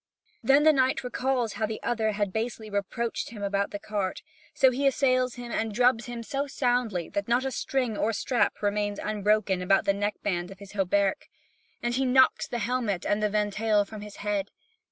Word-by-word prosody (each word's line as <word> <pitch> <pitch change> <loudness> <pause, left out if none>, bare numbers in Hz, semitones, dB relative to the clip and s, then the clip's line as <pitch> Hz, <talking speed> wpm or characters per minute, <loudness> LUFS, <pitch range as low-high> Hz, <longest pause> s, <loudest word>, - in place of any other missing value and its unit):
Then 280 +2 +5
the 310 0 +7
knight 265 0 +2
recalls 250 -2 -1
how 215 - -1
the 215 0 -5
other 220 -2 0
had 205 -2 -1
basely 220 -1 -3
reproached 215 +4 -2
him 210 -3 -8
about 200 0 0
the 205 - -5
cart; 200 -2 -3 0.3
so 265 -1 +4
he 275 +3 +1
assails 255 -2 +2
him 245 -1 -7
and 225 -1 -1
drubs 245 +1 +2
him 240 -1 -5
so 280 +4 -2
soundly 245 - 0
that 200 0 -3
not 240 +3 +2
a 265 - -1
string 250 -3 -1
or 215 +2 +1
strap 230 +1 0
remains 205 0 0
unbroken 210 -2 +1
about 195 +1 +3
the 200 - +3
neck 205 +1 -1
band 175 -3 -1
of 195 - -11
his 200 0 -12
hauberk, 200 0 0 0.5
and 240 0 0
he 265 +2 +1
knocks 260 +1 +4
the 240 - -3
helmet 225 -5 -1
and 205 +1 +1
ventail 210 0 +1
from 215 0 -9
his 210 -1 -9
head. 205 -1 -1
215 Hz, 195 wpm, -27 LUFS, 205-250 Hz, 0.5 s, the